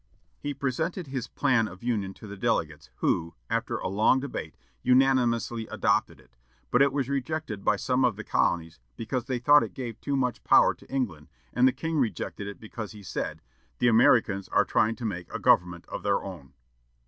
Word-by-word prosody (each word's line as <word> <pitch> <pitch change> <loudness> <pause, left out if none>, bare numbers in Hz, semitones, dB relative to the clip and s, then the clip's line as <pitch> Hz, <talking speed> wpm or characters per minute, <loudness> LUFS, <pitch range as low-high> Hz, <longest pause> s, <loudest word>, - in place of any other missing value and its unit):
He 145 -1 -4
presented 160 +7 -2
his 130 -3 -4
plan 125 -6 +2
of 95 +1 -12
union 105 -6 -1
to - - -12
the 100 -1 -8
delegates, 95 - -1
who, 85 -1 0 0.2
after - - -1
a - - -3
long 105 +7 +3
debate, 140 0 -6 0.3
unanimously 125 -3 +2
adopted - - 0
it, - - -23 0.4
but 125 - +4
it 140 0 +5
was 135 -2 -1
rejected 140 -5 -3
by 105 - +3
some 125 +5 0
of 125 -4 +2
the 110 - -7
colonies 80 -5 0 0.2
because 120 +2 -3
they 130 - -1
thought 145 +4 +6
it - - -5
gave 120 -4 -6
too 140 - -1
much 125 -2 -1
power - - +5
to - - -19
England, 105 - -2 0.3
and 125 +1 +5
the - - +4
king 160 +3 -2
rejected 105 -3 -2
it 100 - -8
because 110 -1 -7
he 105 -1 -12
said, 95 - -4 0.3
"The 120 - +3
Americans 110 -4 +4
are - - +3
trying 110 +1 +2
to 120 - -6
make 90 -5 -4
a - - -3
government 85 -1 +2
of - - -6
their 100 -1 +1
own." 85 -8 -9
120 Hz, 195 wpm, -27 LUFS, 100-130 Hz, 0.4 s, thought